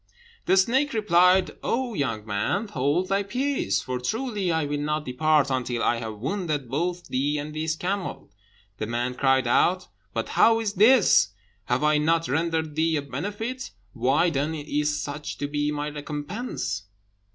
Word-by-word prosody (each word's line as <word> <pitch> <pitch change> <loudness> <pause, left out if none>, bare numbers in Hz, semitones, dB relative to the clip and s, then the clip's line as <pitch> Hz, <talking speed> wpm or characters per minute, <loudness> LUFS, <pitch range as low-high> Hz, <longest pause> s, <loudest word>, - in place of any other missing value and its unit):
The 190 - +4
snake 260 +9 +2
replied, 185 -3 +4
"O 245 0 -1
young 115 - -2
man, 145 - -1
hold 145 +6 0
thy 195 +1 +2
peace, 260 +7 -1
for 130 -1 -3
truly 210 - -2
I 160 -2 +1
will 145 0 -2
not 150 +1 -2
depart 145 +2 +2
until 125 -2 -1
I 120 - +2
have 110 -2 -6
wounded 150 - -2
both 175 +5 -2
thee 145 +3 0
and 150 +1 -5
this 155 0 -1
camel." 185 - -4 0.5
The 110 - -2
man 120 +2 -1
cried 135 0 +2
out, 180 +9 +2 0.2
"But 115 +1 -3
how 225 0 +4
is 215 -3 -2
this? 210 - +5 0.3
Have 125 +4 0
I 150 0 +4
not 165 +2 +2
rendered 160 +1 -1
thee 160 +1 +2
a 145 - -1
benefit? 205 - -4 0.2
Why, 135 +8 +2
then, 150 +2 -1
is 150 0 -1
such 145 +1 -5
to 145 - -2
be 145 0 -1
my 150 0 -3
recompense? 145 - -4
150 Hz, 165 wpm, -25 LUFS, 135-190 Hz, 0.5 s, this